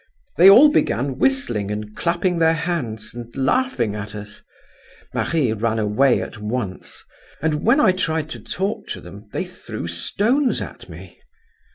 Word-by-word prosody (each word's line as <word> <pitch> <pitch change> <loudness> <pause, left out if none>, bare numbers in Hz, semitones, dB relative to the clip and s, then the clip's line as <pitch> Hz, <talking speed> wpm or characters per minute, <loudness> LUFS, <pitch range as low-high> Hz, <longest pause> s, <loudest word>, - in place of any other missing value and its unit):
They 185 +3 +9
all 260 +10 +9
began 135 - 0
whistling 265 - +1
and 105 0 -5
clapping 170 +1 0
their 165 0 +4
hands, 135 -11 -3
and 120 -1 -8
laughing 135 - 0
at 105 0 -6
us. 105 0 -9 0.7
Marie 145 -9 0
ran 110 +1 -1
away 110 +5 +2
at - - -9
once; 105 -3 -5 0.4
and 150 0 -1
when 240 +6 +4
I 215 -9 +5
tried 160 -4 -1
to - - -5
talk 195 +3 -3
to - - -5
them, 100 +4 -12
they - - -2
threw - - -8
stones 220 - 0
at - - -8
me. - - -12
135 Hz, 155 wpm, -21 LUFS, 105-180 Hz, 0.7 s, They